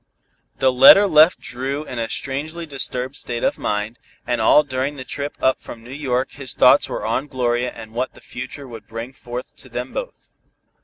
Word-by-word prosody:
The 130 -1 +3
letter 135 +11 +9
left 160 -2 +5
Dru 135 +4 -4
in 125 -5 -6
a 115 -1 -2
strangely 155 +5 -3
disturbed 130 -2 -3
state 120 -4 -4
of - - 0
mind, 105 +3 -2 0.3
and 120 -2 -1
all 150 +7 +6
during 135 +1 -2
the 130 - -7
trip 140 +3 -5
up 130 - +2
from 115 -1 -11
New 125 +3 -10
York 130 -3 -1
his 135 -3 -3
thoughts - - +5
were - - -4
on 140 - -1
Gloria 125 -2 -1
and 110 -1 -11
what 125 +2 -3
the - - -14
future 130 +3 -8
would 115 -4 -11
bring 115 +3 -7
forth 125 -1 -8
to - - -14
them - - -5
both. - - -7
130 Hz, 195 wpm, -21 LUFS, 120-140 Hz, 0.3 s, letter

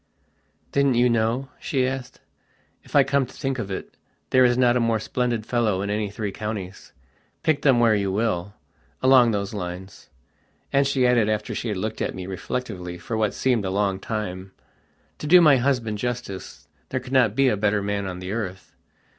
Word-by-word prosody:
"Didn't 140 -2 +2
you 120 +1 +4
know?" 115 +4 0
she 130 -3 0
asked. 130 -1 -6 0.6
"If - - -11
I - - +7
come 140 -2 +1
to 130 - -15
think 135 -3 -3
of 100 - -4
it 95 - -6 0.4
there 130 0 +6
is 120 0 +4
not 125 -1 +4
a - - +3
more 115 -1 +1
splendid 120 0 -2
fellow 110 -6 0
in 100 - -2
any 105 0 -1
three 105 0 -4
counties, 100 -3 -6 0.5
pick 155 -2 +2
them 135 -5 +4
where 115 -2 +5
you 100 -2 0
willalong 115 +5 +1
those 100 0 -2
lines." 95 0 -7 0.6
And 140 0 +4
she 135 -2 +2
added, 120 -4 +3
after 105 -1 -2
she - - -4
had 105 -3 -2
looked 110 +3 -4
at - - -2
me 90 - -6
reflectively 95 -2 -5
for 115 +6 -5
what 110 -2 0
seemed 125 -5 +1
a 95 - -2
long 95 0 0
time: 95 -3 -5 0.7
"To 150 - -5
do 180 +4 +8
my 150 -5 +6
husband 120 -5 0
justice 120 -5 -5 0.2
there 130 - -1
could 130 +1 -9
not 120 -5 +4
be 135 0 +4
a 120 - +3
better 105 0 +1
man 100 -1 -2
on 90 -1 -5
the 90 +1 -6
earth. 95 -4 -5
110 Hz, 190 wpm, -24 LUFS, 100-125 Hz, 0.7 s, do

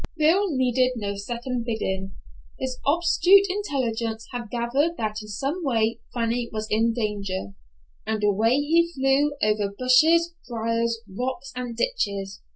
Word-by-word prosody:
Bill 335 +7 +4
needed 255 0 +2
no 200 -3 -3
second 240 +4 -4
bidding. 195 -4 -3 0.4
His 260 -1 -3
obtuse 350 +5 +5
intellect 275 - -2 0.3
had 240 -3 -5
gathered 265 +9 0
that 215 -1 -2
in 210 - -10
some 275 - -3
way 230 -5 +1
Fanny 235 0 -1
was 215 0 -3
in 225 +2 +3
danger, 200 - -3 0.5
and 220 -1 -1
away 215 +4 +3
he 330 +4 +2
flew 270 +2 +2
over 210 -1 +1
bushes, 320 +7 +4 0.2
briers, 230 0 -1
rocks 250 +6 -4
and 245 -2 -5
ditches. 200 - -2
240 Hz, 135 wpm, -25 LUFS, 220-280 Hz, 0.5 s, obtuse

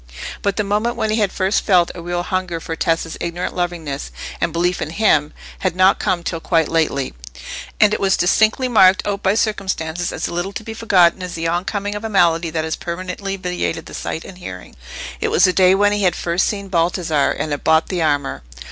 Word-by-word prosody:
But 200 -1 0
the 210 - +1
moment 210 +4 0
when 220 -2 -1
he 215 - +1
had 205 -3 +1
first 190 +1 0
felt 180 -4 +3
a 175 - -8
real 175 +1 -2
hunger 185 -2 -2
for 165 0 -5
Tessa's 165 0 -1
ignorant 175 +1 -3
lovingness 170 - -3 0.3
and - - +1
belief 175 +2 0
in 155 - -2
him 160 -6 +2 0.3
had 185 -2 -1
not 185 +1 +4
come 175 -2 0
till 165 -1 -3
quite 165 -2 +1
lately, 155 -5 0 0.7
and 210 -1 +5
it - - 0
was 195 -1 +2
distinctly 220 +7 +3
marked 190 -6 +5
out 200 -1 -2
by 190 +2 +2
circumstances 180 -6 -1
as - - -3
little 175 +3 -3
to 220 - -6
be 225 - -6
forgotten 190 -5 +3
as 180 -1 -5
the 165 0 -2
oncoming 200 +4 -2
of 205 +1 -6
a 225 - -3
malady 170 -4 +3
that 160 0 -2
has 160 0 -2
permanently 185 +3 -5
vitiated 180 - -3
the - - -11
sight 160 - -4
and 185 -2 -11
hearing. 90 - -9 0.4
It - - 0
was - - +3
the 185 - +5
day 185 0 +5
when 205 +1 +3
he 205 0 0
had 180 -3 +2
first 170 +1 0
seen 200 -2 -3
Baldassarre, 165 -4 +1
and 155 - -3
had 145 - -3
bought 160 0 +3
the 180 -3 -1
armour. 145 -3 0
180 Hz, 215 wpm, -19 LUFS, 165-200 Hz, 0.7 s, and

